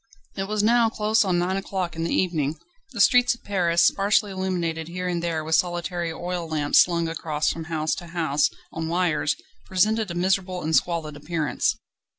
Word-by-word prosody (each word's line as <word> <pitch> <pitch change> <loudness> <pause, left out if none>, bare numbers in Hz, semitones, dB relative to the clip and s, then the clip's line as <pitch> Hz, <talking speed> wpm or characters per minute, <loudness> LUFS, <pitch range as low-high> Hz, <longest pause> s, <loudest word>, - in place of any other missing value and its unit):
It 195 - -2
was 210 0 0
now 230 +1 +4
close 220 0 +2
on 185 -3 +1
nine 180 +2 0
o'clock 190 -3 -3
in 165 - -3
the 165 - -2
evening. 160 -4 0 0.3
The 235 - -7
streets 245 +4 +5
of - - -24
Paris, 175 -4 +2
sparsely 205 +1 +2
illuminated 175 -4 -2
here 180 +1 -4
and 175 -1 -1
there 165 -2 -2
with 160 +1 -3
solitary 175 -1 0
oil 175 +1 -4
lamps 150 -2 +2
swung 170 -2 +3
across 155 -2 -1
from 165 -1 -7
house 160 -1 -1
to 175 - -8
house 160 -4 +1 0.2
on 160 0 -3
wires, 170 -3 +1 0.3
presented 215 +3 +1
a 170 - -5
miserable 185 0 0
and 160 +1 +1
squalid 165 -3 0
appearance. 150 -1 -1
175 Hz, 180 wpm, -24 LUFS, 160-190 Hz, 0.3 s, streets